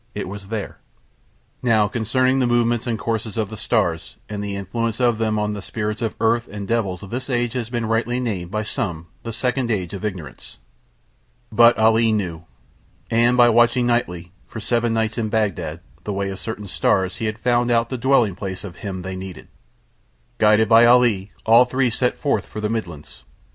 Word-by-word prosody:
It -, -, -4 dB
was 100 Hz, +1 st, -8 dB
there. 110 Hz, -1 st, -5 dB, 0.8 s
Now 110 Hz, -4 st, +3 dB
concerning 130 Hz, +4 st, +1 dB
the 125 Hz, -, +2 dB
movements 120 Hz, 0 st, +1 dB
and 115 Hz, -2 st, -1 dB
courses 110 Hz, -1 st, -3 dB
of 110 Hz, -2 st, -1 dB
the -, -, -5 dB
stars -, -, -1 dB
and 105 Hz, -1 st, -5 dB
the 100 Hz, -1 st, -4 dB
influence 115 Hz, +4 st, -3 dB
on 120 Hz, -2 st, +3 dB
them 110 Hz, -1 st, 0 dB
of 105 Hz, -1 st, -2 dB
spirits 105 Hz, 0 st, -4 dB
of 115 Hz, -2 st, -2 dB
Earth 115 Hz, +1 st, +2 dB
and 100 Hz, -1 st, -7 dB
devils 100 Hz, -6 st, -1 dB
this 125 Hz, +7 st, -6 dB
age 120 Hz, -2 st, 0 dB
has 120 Hz, -3 st, -3 dB
been 120 Hz, -1 st, -2 dB
rightly 115 Hz, +2 st, 0 dB
named 100 Hz, -8 st, -3 dB
by 105 Hz, +2 st, -2 dB
some 90 Hz, -, -4 dB
The 115 Hz, -, -5 dB
Second 125 Hz, +2 st, -1 dB
Age 95 Hz, -6 st, -2 dB
of 100 Hz, -, -6 dB
Ignorance. 90 Hz, -7 st, -6 dB, 0.9 s
But 115 Hz, +2 st, +6 dB
Ali 110 Hz, +1 st, +4 dB
knew. 90 Hz, -6 st, -2 dB, 0.7 s
And 120 Hz, +2 st, +3 dB
by 120 Hz, -1 st, +7 dB
watching 120 Hz, +2 st, +4 dB
nightly, 90 Hz, -8 st, -1 dB, 0.2 s
for -, -, -7 dB
seven 120 Hz, -1 st, 0 dB
nights 110 Hz, 0 st, 0 dB
in 110 Hz, -2 st, -1 dB
Bagdad, 100 Hz, -7 st, -1 dB, 0.2 s
the 105 Hz, -, -3 dB
way 100 Hz, 0 st, -2 dB
of 95 Hz, -, -7 dB
certain 110 Hz, -2 st, -6 dB
stars 95 Hz, 0 st, +1 dB
he 115 Hz, -, -3 dB
had 110 Hz, 0 st, -2 dB
found 120 Hz, +1 st, +1 dB
out 115 Hz, -1 st, +2 dB
the 130 Hz, -, -3 dB
dwelling 125 Hz, -5 st, +3 dB
place 95 Hz, 0 st, -6 dB
of 90 Hz, -4 st, -9 dB
Him 95 Hz, -3 st, -5 dB
they 95 Hz, +1 st, -5 dB
Needed. 95 Hz, -2 st, -9 dB, 0.9 s
Guided 110 Hz, 0 st, +5 dB
by 115 Hz, +2 st, +7 dB
Ali 120 Hz, -5 st, +4 dB
all 115 Hz, +3 st, +7 dB
three 125 Hz, 0 st, 0 dB
set 125 Hz, +2 st, 0 dB
forth 145 Hz, -, -1 dB
for 105 Hz, -, -7 dB
the 105 Hz, 0 st, -1 dB
Midlands. 85 Hz, -, -6 dB
110 Hz, 190 wpm, -21 LUFS, 100-120 Hz, 0.9 s, by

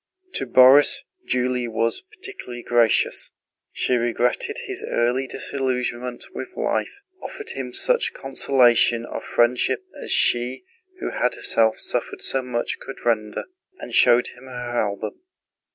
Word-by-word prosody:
To -, -, -1 dB
Borís, 140 Hz, -, +6 dB, 0.3 s
Julie 125 Hz, -1 st, 0 dB
was 115 Hz, 0 st, 0 dB
particularly 375 Hz, -, -9 dB
gracious: 120 Hz, -2 st, +2 dB, 0.4 s
she 125 Hz, -, 0 dB
regretted 120 Hz, -, 0 dB
his 390 Hz, -1 st, -5 dB
early 125 Hz, +3 st, 0 dB
disillusionment 125 Hz, -2 st, -3 dB
with 370 Hz, -1 st, -8 dB
life, 405 Hz, -, -2 dB, 0.2 s
offered 445 Hz, +1 st, -7 dB
him -, -, -5 dB
such -, -, +3 dB
consolation 125 Hz, -3 st, +2 dB
of -, -, -6 dB
friendship 125 Hz, -, +1 dB, 0.2 s
as -, -, -6 dB
she 125 Hz, +1 st, +2 dB, 0.4 s
who -, -, -3 dB
had 125 Hz, -, 0 dB
herself 110 Hz, -1 st, +2 dB
suffered -, -, -3 dB
so 135 Hz, -, +2 dB
much 125 Hz, -2 st, -3 dB
could 135 Hz, -, -10 dB
render, 110 Hz, -3 st, 0 dB, 0.3 s
and -, -, -9 dB
showed 120 Hz, 0 st, +5 dB
him 125 Hz, +2 st, -15 dB
her 125 Hz, -2 st, -4 dB
album. 105 Hz, -, -4 dB
125 Hz, 130 wpm, -23 LUFS, 120-135 Hz, 0.4 s, Borís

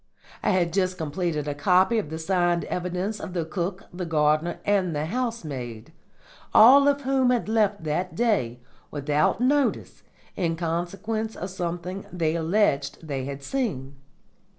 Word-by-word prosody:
I -, -, +1 dB
had 175 Hz, -4 st, +1 dB
just 185 Hz, -1 st, 0 dB
completed 155 Hz, -1 st, -2 dB
a 145 Hz, -, -1 dB
copy 185 Hz, +8 st, +3 dB
of 180 Hz, -, -4 dB
the 160 Hz, -, -5 dB
signed 175 Hz, 0 st, +1 dB
evidence 180 Hz, +4 st, -3 dB
of 180 Hz, -, -7 dB
the 170 Hz, -3 st, -1 dB
cook, 180 Hz, +3 st, -3 dB
the 180 Hz, +1 st, -4 dB
gardener, 155 Hz, +1 st, +1 dB
and 190 Hz, -5 st, +1 dB
the 150 Hz, +1 st, -1 dB
housemaid, 155 Hz, -, -4 dB, 0.6 s
all 275 Hz, +6 st, +8 dB
of 285 Hz, 0 st, +2 dB
whom 265 Hz, -1 st, +2 dB
had 245 Hz, -3 st, +1 dB
left 210 Hz, -4 st, +1 dB
that 175 Hz, +4 st, -2 dB
day 165 Hz, -, 0 dB, 0.3 s
without 150 Hz, -, 0 dB
notice 280 Hz, +2 st, +1 dB, 0.3 s
in 170 Hz, -3 st, 0 dB
consequence 190 Hz, +7 st, -3 dB
of 185 Hz, +1 st, -5 dB
something 180 Hz, +1 st, -4 dB
they 165 Hz, -3 st, 0 dB
alleged 160 Hz, -4 st, 0 dB
they 135 Hz, -3 st, -3 dB
had 140 Hz, 0 st, -6 dB
seen. 140 Hz, -, -3 dB
180 Hz, 150 wpm, -25 LUFS, 155-210 Hz, 0.6 s, all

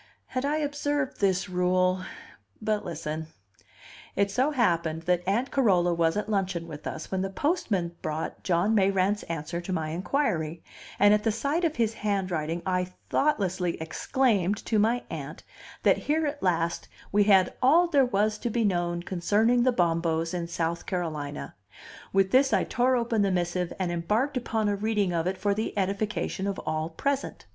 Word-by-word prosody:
Had 255 Hz, +1 st, -2 dB
I 295 Hz, +2 st, +1 dB
observed 290 Hz, -1 st, -1 dB
this 195 Hz, -1 st, +1 dB
rule 185 Hz, 0 st, +1 dB, 0.6 s
but 215 Hz, -1 st, -1 dB
listen: 160 Hz, -1 st, -4 dB, 0.9 s
It 200 Hz, 0 st, +1 dB
so 260 Hz, +8 st, +2 dB
happened 170 Hz, -, 0 dB
that 180 Hz, 0 st, +1 dB
Aunt 235 Hz, +7 st, 0 dB
Carola 185 Hz, -9 st, +3 dB
was 165 Hz, +1 st, +1 dB
at 210 Hz, -, -2 dB
luncheon 190 Hz, -5 st, -1 dB
with 150 Hz, -2 st, -8 dB
us 155 Hz, -, -6 dB
when 190 Hz, -1 st, 0 dB
the 195 Hz, -, -2 dB
postman 195 Hz, -, -1 dB
brought 155 Hz, +1 st, -4 dB
John 185 Hz, +4 st, +2 dB
Mayrant's 195 Hz, 0 st, +2 dB
answer 165 Hz, +1 st, -3 dB
to 175 Hz, -, -6 dB
my 160 Hz, -3 st, -1 dB
inquiry, 170 Hz, -, -1 dB, 0.3 s
and 205 Hz, +1 st, +6 dB
at 210 Hz, 0 st, +2 dB
the 225 Hz, -, +2 dB
sight 280 Hz, +10 st, -1 dB
of 320 Hz, -2 st, +1 dB
his 230 Hz, -2 st, +1 dB
handwriting 180 Hz, -6 st, -2 dB
I 180 Hz, -1 st, +1 dB, 0.3 s
thoughtlessly 190 Hz, -, +1 dB
exclaimed 205 Hz, -, +1 dB
to 220 Hz, -, +1 dB
my 230 Hz, +4 st, +2 dB
Aunt -, -, -6 dB, 0.4 s
that -, -, +5 dB
here 310 Hz, +2 st, 0 dB
at 290 Hz, 0 st, -3 dB
last 170 Hz, -2 st, 0 dB, 0.2 s
we 205 Hz, 0 st, +4 dB
had 190 Hz, -3 st, +5 dB
all 310 Hz, +7 st, +6 dB
there 285 Hz, -5 st, +4 dB
was 215 Hz, -3 st, +1 dB
to 240 Hz, -, -2 dB
be 230 Hz, +1 st, 0 dB
known 175 Hz, -3 st, 0 dB
concerning 210 Hz, +7 st, +2 dB
the 255 Hz, +1 st, +4 dB
Bombos 165 Hz, -4 st, 0 dB
in 175 Hz, -1 st, -2 dB
South 170 Hz, 0 st, -2 dB
Carolina; 155 Hz, -, -4 dB, 0.6 s
with 195 Hz, 0 st, +2 dB
this 265 Hz, -1 st, +4 dB
I -, -, +3 dB
tore 255 Hz, +1 st, +2 dB
open 235 Hz, -3 st, +1 dB
the 200 Hz, -, +2 dB
missive 180 Hz, -1 st, -1 dB
and 185 Hz, -3 st, -1 dB
embarked 210 Hz, +12 st, 0 dB
upon 225 Hz, -3 st, -1 dB
a 205 Hz, -, +1 dB
reading 205 Hz, -3 st, 0 dB
of 165 Hz, 0 st, 0 dB
it 190 Hz, +1 st, -1 dB
for 200 Hz, +2 st, +1 dB
the 215 Hz, +1 st, -3 dB
edification 200 Hz, 0 st, -1 dB
of 200 Hz, -, -2 dB
all 155 Hz, +1 st, -1 dB
present. 275 Hz, +11 st, -2 dB
195 Hz, 170 wpm, -27 LUFS, 175-230 Hz, 0.9 s, and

